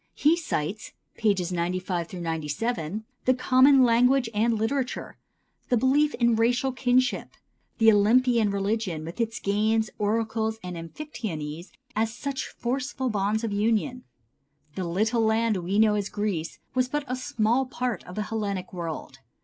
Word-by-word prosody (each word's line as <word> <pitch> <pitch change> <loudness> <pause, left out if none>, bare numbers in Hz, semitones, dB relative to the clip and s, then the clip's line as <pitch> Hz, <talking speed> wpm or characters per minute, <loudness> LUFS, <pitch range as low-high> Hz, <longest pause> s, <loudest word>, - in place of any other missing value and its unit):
He 305 +3 +4
cites 215 - -3 0.3
(pp. 195 -5 +1
95 175 0 -2
97) 165 +4 -3 0.2
the 255 - +4
common 260 +1 +5
language 245 +1 +3
and 225 +2 +2
literature; 250 +4 -2 0.5
the 245 - +3
belief 285 +5 +3
in 235 -2 +3
racial 240 +4 +2
kinship; 255 0 +1 0.4
the 225 -1 +6
Olympian 230 +2 +4
religion, 200 -5 -1
with 170 +8 -5
its 225 -1 -1
games, 215 +2 +1
oracles 220 +1 0
and 180 -1 -5
amphictyonies, 165 - -6 0.3
as 220 +1 +1
such 275 -2 -3
forceful 260 +1 -2
bonds 210 +2 0
of 220 -3 -2
union. 230 +5 0 0.7
The 185 - -3
little 215 +7 +1
land 220 -1 +2
we 185 +3 -2
know 215 -1 +5
as 205 -2 -1
Greece 200 -6 -3 0.2
was 255 0 +2
but 295 +2 -1
a 255 - -2
small 245 0 0
part 250 -2 -3
of 180 - -9
the 210 - -1
Hellenic 200 -4 -3
world. 170 -3 -6
220 Hz, 140 wpm, -26 LUFS, 195-250 Hz, 0.7 s, the